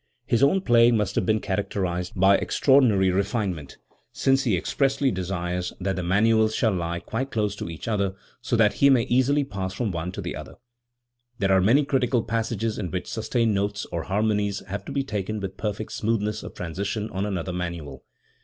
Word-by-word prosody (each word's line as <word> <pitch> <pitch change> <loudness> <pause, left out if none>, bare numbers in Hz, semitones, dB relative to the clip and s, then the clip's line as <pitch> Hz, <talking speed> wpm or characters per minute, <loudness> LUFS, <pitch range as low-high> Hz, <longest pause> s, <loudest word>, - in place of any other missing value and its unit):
His 120 -2 +1
own 165 +8 +4
playing 120 -5 +5
must 105 -2 -1
have - - 0
been 110 0 +3
charac 100 0 -2
terised 90 -2 -2
by 95 +1 +6
extraordinary 115 -11 +3
refinement, 95 - -2 0.3
since 135 0 +2
he 105 -7 +2
expressly 135 - +1
desires 90 -1 -3
that 95 0 -1
the 90 - -2
manuals 110 +4 +3
shall 110 - +2
lie 85 -1 -2
quite 125 +9 -4
close 105 -4 -1
to - - -5
each 80 +4 -8
other, 100 -3 0 0.3
so 120 0 -1
that 110 -2 +4
he 140 - +7
may 130 -4 +5
easily 130 +3 +2
pass 95 -7 -5
from 110 -1 -1
one 85 +1 -3
to - - -7
the - - -4
other*. - - -9 0.8
There 95 -3 +1
are 95 0 +5
many 130 +10 +4
critical 125 -4 +1
passages 115 -1 -2
in 95 -4 -3
which 90 0 -3
sustained 115 0 0
notes 100 +1 -1
or 85 - -2
harmonies 105 0 0
have 100 +2 -5
to - - -7
be 140 - 0
taken 110 -4 -3
with 95 -1 -5
perfect 105 0 -4
smoothness 105 -1 -1
of - - -9
transition 100 +5 -3
on 95 0 -2
another 90 -2 -3
manual. 85 -6 -5
105 Hz, 190 wpm, -25 LUFS, 95-115 Hz, 0.8 s, he